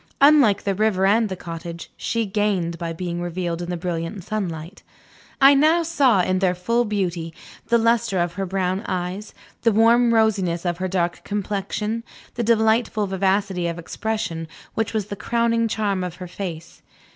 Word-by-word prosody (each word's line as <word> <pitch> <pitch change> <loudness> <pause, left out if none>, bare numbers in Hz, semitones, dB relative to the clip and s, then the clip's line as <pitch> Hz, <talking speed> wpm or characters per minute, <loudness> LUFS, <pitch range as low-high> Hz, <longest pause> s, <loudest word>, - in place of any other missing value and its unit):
Unlike 280 -8 +5
the 200 - 0
river 195 -1 +1
and 215 +2 +3
the 190 - -3
cottage, 170 -1 -8
she 230 -1 -1
gained 195 -5 -1
by 170 -1 -3
being 175 +1 -4
revealed 175 -1 -3
in 175 - -5
the 175 - -2
brilliant 170 +2 -4
sunlight. 180 -4 -4 0.6
I 275 +1 +8
now 310 +5 +4
saw, 275 - +3
in 185 +1 +1
their 185 -1 +2
full 230 +7 +1
beauty, 180 -6 -2 0.3
the 235 - +4
luster 230 -3 +2
of 175 -1 0
her 195 +1 -3
brown 190 0 -1
eyes, 185 +3 -4 0.3
the 230 - +3
warm 230 +3 +4
rosiness 195 -7 +1
of 175 0 -1
her 185 - -1
dark 175 -2 -1
complexion, 210 +2 -3 0.3
the 240 - -3
delightful 220 -1 +2
vivacity 190 -1 0
of 170 0 -3
expression 170 -2 -3 0.3
which 225 -1 -1
was 215 -3 -1
the 205 - -6
crowning 230 +2 +1
charm 205 -4 -1
of 180 -1 -5
her 180 0 -8
face. 170 -3 -7
195 Hz, 170 wpm, -22 LUFS, 175-220 Hz, 0.6 s, I